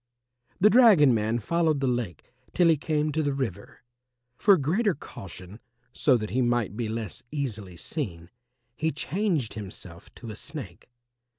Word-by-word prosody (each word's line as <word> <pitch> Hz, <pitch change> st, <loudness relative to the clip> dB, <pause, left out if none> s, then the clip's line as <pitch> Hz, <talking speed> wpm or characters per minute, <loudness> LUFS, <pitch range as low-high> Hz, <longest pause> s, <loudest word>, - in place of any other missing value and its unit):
The 210 Hz, +3 st, +6 dB
dragon 205 Hz, -, +7 dB
man 110 Hz, +1 st, +1 dB
followed 160 Hz, +5 st, +1 dB
the 135 Hz, -, 0 dB
lake 120 Hz, -8 st, -3 dB, 0.2 s
till 175 Hz, -2 st, +5 dB
he 165 Hz, -, +5 dB
came 150 Hz, 0 st, -1 dB
to 160 Hz, +2 st, 0 dB
the 145 Hz, -2 st, -1 dB
river. 110 Hz, -8 st, -5 dB, 0.5 s
For 195 Hz, +8 st, +5 dB
greater 180 Hz, -, +1 dB
caution, 95 Hz, -5 st, -10 dB, 0.3 s
so 130 Hz, -4 st, +3 dB
that 110 Hz, -3 st, -5 dB
he 130 Hz, +4 st, +1 dB
might 120 Hz, -5 st, 0 dB
be 115 Hz, 0 st, -2 dB
less 110 Hz, -2 st, -5 dB
easily 110 Hz, -, -4 dB
seen, 85 Hz, -, -5 dB, 0.4 s
he 160 Hz, +6 st, 0 dB
changed 160 Hz, -, -1 dB
himself 95 Hz, -4 st, -10 dB
to 115 Hz, -, -8 dB
a -, -, -8 dB
Snake. 125 Hz, -, -9 dB
130 Hz, 155 wpm, -27 LUFS, 105-155 Hz, 0.5 s, dragon